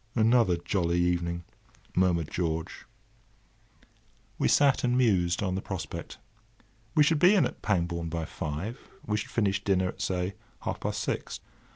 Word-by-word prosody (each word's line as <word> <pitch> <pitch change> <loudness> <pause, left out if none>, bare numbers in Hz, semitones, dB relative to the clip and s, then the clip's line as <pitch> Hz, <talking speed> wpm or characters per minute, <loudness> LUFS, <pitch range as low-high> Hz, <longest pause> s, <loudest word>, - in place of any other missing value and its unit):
"Another 115 -5 +4
jolly 85 -1 0
evening!" 85 -1 0 0.5
murmured 85 -4 +2
George. 80 -2 -3 1.5
We - - +3
sat 140 -2 +4
and 125 0 +2
mused 95 -8 +2
on 95 -2 0
the 95 - -2
prospect. 95 -5 -6 0.8
We 150 - +6
should 150 +1 +3
be 180 +6 +6
in 195 - +4
at - - -5
Pangbourne 85 -4 0
by 80 0 -3
five. 80 +12 -5 0.3
We 105 0 0
should 105 - -4
finish 100 -3 0
dinner 95 -2 +2
at, - - -8
say, 90 +1 -1 0.3
half - - -3
past - - -2
six. - - -3
95 Hz, 150 wpm, -28 LUFS, 85-110 Hz, 1.5 s, We